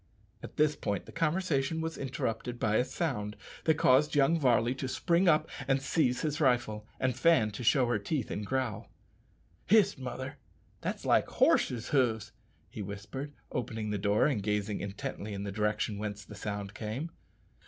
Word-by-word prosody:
At - - -10
this 150 0 +3
point 100 -3 -2
the - - -11
conversation 160 -3 0
was 160 0 -3
interrupted 120 -2 -3
by 110 0 +2
a - - +4
sound 120 -8 -2 0.3
that 160 - +4
caused 145 +2 +4
young 145 +4 +4
Varley 120 -3 +3
to 130 0 -4
spring 175 +7 +2
up 155 -2 +4 0.2
and 135 0 +3
seize 135 -2 +1
his 150 -1 -1
rifle, 120 -5 +1
and 130 -1 +1
Fan 165 -11 +4
to 105 +4 -6
show 125 +2 +4
her 120 -3 +1
teeth 125 +4 -2
and 105 - -3
growl. 130 0 -2 0.8
"Hist, 200 -4 +4
mother! 130 +2 -6 0.4
that's - - -4
like - - +4
horses' 120 -2 +2
hoofs," 115 -6 +1 0.4
he 110 - -7
whispered, 100 +9 -6 0.2
opening 110 -3 -3
the 105 - -1
door 105 +2 +3
and 135 -9 +1
gazing 105 0 -1
intently 100 +1 -5
in 100 - -4
the 100 - -4
direction 105 0 -1
whence 105 -1 -5
the - - -11
sound 100 -1 -5
came. 120 +11 -4
125 Hz, 170 wpm, -31 LUFS, 105-145 Hz, 0.8 s, a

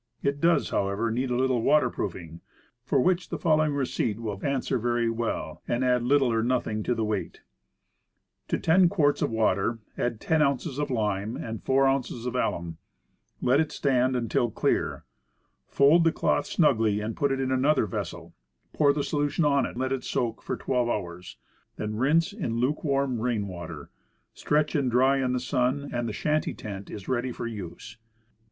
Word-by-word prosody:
It 140 0 -1
does, 170 0 +3
however, 100 +4 0
need 125 +3 -1
a 125 - 0
little 130 -1 +1
water 130 -1 +3
proofing; 85 -4 -5 0.4
for 135 +2 +1
which 180 +6 +1
the - - -3
following 155 -3 +2
receipt 125 -5 -1
will 105 -4 -5
answer 135 -2 0
very 120 0 0
well, 115 0 -3
and 120 +2 0
add 125 -1 +3
little 130 0 +3
or 115 - +2
nothing 115 -3 0
to 120 - 0
the 110 - -1
weight: 105 -2 -3 1.1
To - - 0
10 175 +2 +4
quarts 150 -7 +2
of - - +1
water 110 0 +1 0.2
add 120 -3 -1
10 160 +5 +1
ounces 140 0 0
of 145 - -1
lime, 105 -2 -1
and 115 -1 -5
4 135 +1 +3
ounces 130 -3 -1
of 125 - -2
alum; 85 -9 -2 0.7
let 130 +3 +4
it 160 -1 0
stand 130 -2 +1
until 120 0 0
clear; - - -1 0.6
fold 150 +5 +5
the 165 - +4
cloth - - 0
snugly 110 - +2
and 110 +1 -4
put 140 -1 +1
it 135 - -1
in 130 -1 -1
an 130 0 +1
other 145 -5 +3
vessel, 100 - -6 0.4
pour 145 -2 +4
the 145 0 -1
solution 145 +2 0
on 140 -1 +3
it, - - -9
let 130 +1 -1
it 135 -2 -2
soak 115 -2 -2
for - - -4
12 125 -2 0
hours; 90 -5 -5 0.4
then 105 0 -4
rinse 160 - +2
in 170 - -3
luke 130 +5 0
warm 140 -4 0
rain 110 -3 -1
water, 85 -4 -8 0.4
stretch 150 0 0
and 140 -4 +1
dry 130 +3 +3
in 125 -1 0
the 125 - 0
sun, 130 +2 -1
and 120 -1 -1
the - - -3
shanty 155 +8 -1
tent 100 -2 -7
is 100 -2 -8
ready 130 0 -1
for 120 - -6
use. 110 0 -7
125 Hz, 185 wpm, -27 LUFS, 110-140 Hz, 1.1 s, fold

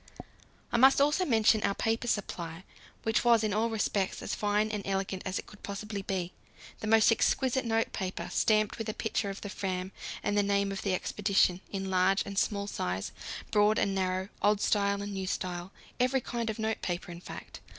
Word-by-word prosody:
I - - +2
must 265 +3 +7
also 295 +6 +3
mention 220 -4 +4
our 200 - +1
paper 225 +2 0
supply, 175 -6 -3 0.4
which 220 -1 +1
was 235 -2 +5
in 215 -2 0
all 220 +3 +1
respects 210 -3 -1
as - - -3
fine 210 +1 +1
and 210 -1 -2
elegant 195 -1 -2
as 185 - -1
it - - -5
could 210 - -15
possibly 200 0 -5
be: 185 -2 -3 0.5
the 220 - -4
most 225 +1 +6
exquisite 260 +3 +2
notepaper, 225 -4 -1
stamped 215 0 +2
with 225 - -3
a 215 - -3
picture 220 -1 -1
of 195 - -6
the - - -5
Fram 185 -1 -3 0.3
and 205 - 0
the 205 - +4
name 200 0 +1
of 195 - -4
the 195 -2 +1
expedition, 195 -2 +1
in 195 -1 -3
large 185 +2 +3
and 200 0 -1
small 200 -2 0
size, 95 - -3 0.4
broad 210 +1 +4
and 195 - +1
narrow, 185 0 -1
old 205 0 +3
style 200 -1 +1
and 205 0 -5
new 190 -1 -3
style 180 0 -3 0.3
every 255 +2 +3
kind 235 -1 -3
of 220 - -3
notepaper, 190 -6 -2
in 170 0 -9
fact. - - -9
205 Hz, 190 wpm, -30 LUFS, 190-220 Hz, 0.5 s, must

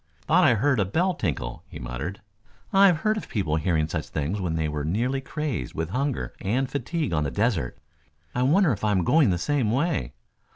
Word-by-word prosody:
"Thought 180 +4 +3
I 125 - +5
heard 130 +3 +2
a 100 - +3
bell 175 - +1
tinkle," 65 - -3
he - - -9
muttered. 65 +11 -5 0.5
"I've 195 -5 +5
heard 215 0 +1
of - - -6
people 80 -8 0
hearing 80 -1 +1
such 80 -1 -3
things 80 +7 -2
when 85 -3 -1
they 80 -1 0
were 75 -1 -3
nearly 120 - 0
crazed 140 - -4
with 80 +1 -3
hunger 130 - -2
and 125 +7 0
fatigue 145 - -2
on 75 -1 +1
the 70 - -1
desert. 90 - 0 0.6
I 125 - -1
wonder 155 +6 +4
if 110 - -3
I 105 - +2
am 95 -4 +2
going 150 - +4
the 90 - +1
same 125 - 0
way. 135 - 0
105 Hz, 205 wpm, -25 LUFS, -, 0.6 s, I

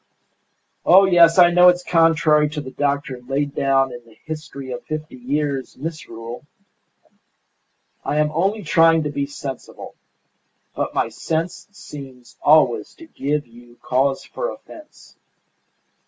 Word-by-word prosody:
"Oh, 190 +2 +7
yes, 170 -2 +5
I 175 -1 +7
know 180 +1 +6
it's 180 0 +1
contrary 160 -3 +3
to 150 0 -5
the 130 -2 -9
doctrine 140 -3 -3
laid 140 +1 -1
down 135 -1 +1
in 120 0 -10
the 115 -1 -21
'History 150 -4 -7
of 125 - -6
Fifty 155 -1 -6
Years' 135 +1 -3
Misrule.' 130 -6 -7 1.6
I 150 - -2
am 150 0 +2
only 195 +7 -1
trying 165 0 +4
to 150 - -3
be 140 -1 -2
sensible. 135 -2 -8 0.8
But - - -3
my - - 0
sense 165 +2 -4
seems 135 - -12
always 125 -8 +3
to 330 - -13
give 150 - -3
you 120 +1 -18
cause 135 +1 0
for - - -4
offence. 310 -9 -14
150 Hz, 135 wpm, -21 LUFS, 135-165 Hz, 1.6 s, Oh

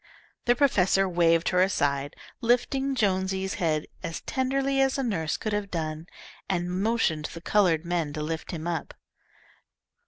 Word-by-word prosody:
The 245 - +4
professor 195 -8 +3
waved 170 -1 +3
her 180 0 +3
aside, 145 -7 +1 0.3
lifting 265 +3 +1
Jonesy's 190 -3 0
head 155 -3 +1 0.2
as 165 -2 -5
tenderly 270 +1 0
as 270 0 +2
a 270 - -1
nurse 165 -10 -1
could 215 - -3
have 205 -1 -2
done, 160 -1 -4 0.4
and 175 -2 -1
motioned 185 -5 0
the 165 - -6
coloured 175 -4 +2
men 170 -3 -1
to 150 - -3
lift 160 +1 -4
him 165 -3 -5
up. 170 -3 -3
185 Hz, 150 wpm, -27 LUFS, 165-225 Hz, 0.4 s, The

